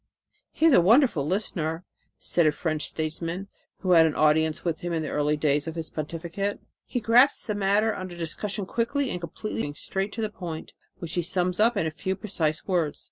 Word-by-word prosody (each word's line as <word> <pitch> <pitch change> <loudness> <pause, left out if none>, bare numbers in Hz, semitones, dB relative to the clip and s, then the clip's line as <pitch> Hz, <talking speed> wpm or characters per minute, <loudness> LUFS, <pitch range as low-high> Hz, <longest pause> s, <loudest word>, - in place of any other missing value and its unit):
"He 320 - +1
is 325 - +6
a 180 - +7
wonderful 210 - +4
listener," 170 -3 -1 0.3
said 170 -3 +2
a - - +4
French 155 -1 -2
statesman 165 +4 -3 0.3
who 185 - 0
had 165 -2 +7
an 155 - -2
audience 155 +1 +2
with 165 -2 -1
him 175 0 -4
in 160 -1 -1
the 155 - -4
early 150 +1 +1
days 145 0 +1
of 160 - -4
his 165 -2 -3
pontificate. 170 +6 -4 0.3
"He 245 - -2
grasps 245 +5 +4
the 210 - -1
matter 205 +2 +2
under 185 -2 -7
discussion 195 +5 -2
quickly 245 +6 -1
and 180 - -4
completely, 175 +6 -4
going 145 0 -4
straight 195 +5 -3
to 225 - -4
the 215 - -2
point, 170 -5 -7 0.2
which 170 -1 -6
he 175 - +1
sums 180 +1 0
up 225 +1 +4
in 185 - +1
a 160 - -1
few 190 +4 -3
precise 165 -7 -1
words. 170 -6 0
175 Hz, 205 wpm, -26 LUFS, 160-205 Hz, 0.3 s, a